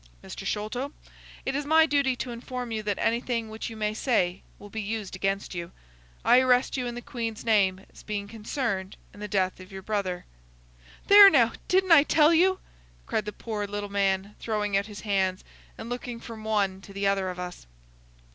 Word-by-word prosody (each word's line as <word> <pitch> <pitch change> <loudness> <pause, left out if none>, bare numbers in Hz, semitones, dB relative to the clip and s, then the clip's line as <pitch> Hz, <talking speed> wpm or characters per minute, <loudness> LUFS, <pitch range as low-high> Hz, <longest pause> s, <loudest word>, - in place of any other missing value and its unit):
—Mr. - - -7
Sholto, 245 +7 -3 0.5
it 270 - -1
is 290 - -1
my 320 +2 +5
duty 280 -3 +1
to 245 0 -5
inform 245 0 -6
you 220 -1 -2
that 205 -2 -2
anything 230 -1 -1
which 220 +1 -5
you 225 - -9
may 210 0 -1
say 195 -7 0 0.2
will 205 0 -13
be 220 - -4
used 210 -2 -4
against 195 +1 -2
you. 170 -1 -5 0.5
I 250 - +7
arrest 255 -1 +3
you 250 -2 -2
in 240 - -5
the 240 - -7
Queen's 230 -3 -5
name 195 -4 +2
as - - -14
being 205 -2 -4
concerned 210 -3 -3 0.2
in - - -14
the 210 - -5
death 190 -3 0
of 185 +1 -12
your 190 0 -8
brother." 195 -4 -2 0.8
"There, 405 0 +10
now! 240 -9 +4 0.2
Didn't 375 0 +2
I 325 -3 +9
tell 305 +2 +4
you!" 370 +3 +4 0.5
cried 215 - -1
the 210 - -4
poor 210 -2 -4
little 205 0 -4
man, 195 0 0
throwing 210 -3 -1
out 200 +1 +1
his 210 -1 -9
hands, 190 -3 0 0.3
and 225 - -7
looking 245 -1 -5
from 225 -2 -9
one 200 -3 0
to 195 - -13
the 200 0 -2
other 195 -1 +1
of 180 - -6
us. 180 - -7
215 Hz, 195 wpm, -27 LUFS, 195-245 Hz, 0.8 s, There